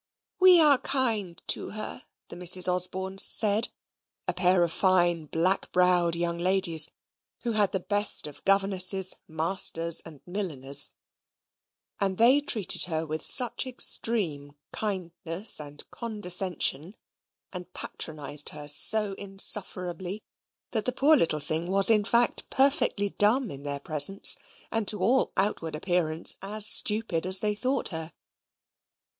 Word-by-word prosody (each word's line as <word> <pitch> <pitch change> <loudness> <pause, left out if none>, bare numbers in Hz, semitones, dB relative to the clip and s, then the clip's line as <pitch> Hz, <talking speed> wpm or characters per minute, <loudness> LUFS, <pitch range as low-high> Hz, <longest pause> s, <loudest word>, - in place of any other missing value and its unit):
"We 370 -2 +6
are 295 -4 +3
kind 220 -10 -3
to - - +1
her," 215 0 -8 0.2
the - - -10
Misses 180 +1 +4
Osborne 185 +1 -2
said, 210 +1 +2 0.6
a - - -1
pair 180 0 +1
of 170 - -2
fine 175 -4 0
black 180 +6 -1
browed 180 -2 +1
young 170 0 -3
ladies 175 -3 +3 0.5
who 240 - -4
had 215 - -3
had 205 -2 +1
the 190 - -1
best 205 +2 +2
of 150 -2 -10
governesses, 195 -1 +2
masters, 165 0 +3
and 155 -4 -11
milliners; 145 -8 -2 1.1
and 195 -2 -2
they 255 +5 +4
treated 220 -9 +3
her 160 -2 -4
with 155 0 -5
such 245 0 +2
extreme 175 - -2 0.2
kindness 185 -2 -5
and 145 -1 -10
condescension, 185 - -2 0.6
and 180 0 -9
patronised 150 -2 -1
her 150 -1 -10
so 205 +8 +4
insufferably, 190 -1 0 0.5
that 220 -3 -3
the 250 - -1
poor 305 +3 +3
little 165 - -1
thing 155 +3 -3
was 195 +3 +3
in 210 -2 +1
fact 235 +2 0
perfectly 265 -7 0
dumb 215 +4 +1
in 140 - -10
their 140 0 -5
presence, 155 +7 +3 0.4
and 225 -3 -3
to 210 - +4
all 240 +8 0
outward 180 -5 -2
appearance 165 -1 0
as 210 +2 -1
stupid 210 -6 +1
as 185 0 +5
they 210 -1 -1
thought 255 +5 -1
her. 160 -1 -5
185 Hz, 135 wpm, -25 LUFS, 165-210 Hz, 1.1 s, We